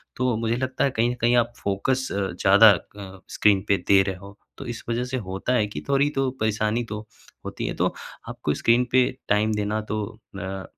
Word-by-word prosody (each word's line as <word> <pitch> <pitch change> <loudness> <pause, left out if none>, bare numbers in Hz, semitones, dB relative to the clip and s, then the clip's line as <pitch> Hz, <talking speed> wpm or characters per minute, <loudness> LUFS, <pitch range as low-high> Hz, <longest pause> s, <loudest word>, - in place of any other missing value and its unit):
तो 125 -2 0
मुझे 115 0 0
लगता 130 0 -1
है 140 - +2
कहीं 120 -1 +1
न - - -2
कहीं 120 +1 +3
आप 120 0 +1
फ़ोकस 130 +7 0
अ, - - -3 0.2
ज़्यादा 100 +5 +6
अ, 95 0 -6 0.2
स्क्रीन 100 -2 +4
पे 100 - +3
दे 100 -1 +6
रहे 95 -1 -3
हो 100 +2 -13 0.2
तो - - -8
इस 120 -1 -6
वजह 120 +1 0
से 130 +1 -3
होता 95 +7 -2
है 115 -4 +2
कि 105 - -7
थोड़ी 140 +1 +3
तो 135 -1 +1
परेशानी 110 +2 0
तो 105 0 -4 0.5
होती - - -4
है। - - -2
तो - - +1 0.4
आपको 75 - -2
स्क्रीन 120 +2 +3
पे 130 0 +4 0.2
टाइम 105 +1 +2
देना 105 +1 -1
तो 105 0 -1 0.4
अ, 95 0 -5
110 Hz, 210 wpm, -24 LUFS, 100-125 Hz, 0.5 s, ज़्यादा